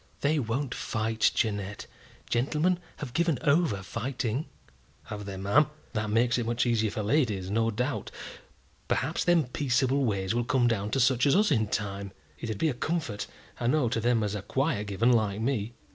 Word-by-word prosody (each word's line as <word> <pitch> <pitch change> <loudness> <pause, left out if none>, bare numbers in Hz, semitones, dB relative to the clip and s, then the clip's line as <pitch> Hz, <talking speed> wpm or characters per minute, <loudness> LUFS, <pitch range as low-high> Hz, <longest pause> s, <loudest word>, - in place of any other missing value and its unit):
"They 150 +2 +2
won't 125 +2 -2
fight, 110 0 +1
Jeannette. 105 -2 -1 0.4
Gentlemen 150 +9 +1 0.2
have 130 -5 -6
given 170 -2 +2
over 140 - +2
fighting." 120 - -3 0.6
"Have 105 -1 -7
they, 100 -1 -6
ma'am? 100 +11 +3 0.3
That 105 -2 -1
makes 120 +3 +2
it 120 - -1
much 120 +1 +1
easier 110 -3 +2
for 105 - -3
ladies, 105 -7 +1
no 115 +1 +2
doubt. 115 0 -2 0.8
Perhaps 150 +6 0
them 175 -2 +4
peaceable 130 +1 +1
ways 100 -4 0
will 120 +1 +1
come 120 0 +2
down 105 -3 0
to 135 - 0
such 130 0 +3
as 140 - +4
us 210 -2 +3
in 110 -6 +2
time. 100 -1 -3 0.3
It'd 110 -3 -4
be 160 - +2
a - - -1
comfort, 125 -5 -2 0.3
I 120 - 0
know, 130 -2 +2
to 115 - 0
them 120 -1 +2
as 105 0 -1
are 105 - -3
quiet 130 - -1
given, 105 +5 +2
like 110 -4 +2
me. 115 -2 -1
120 Hz, 180 wpm, -28 LUFS, 105-135 Hz, 0.8 s, them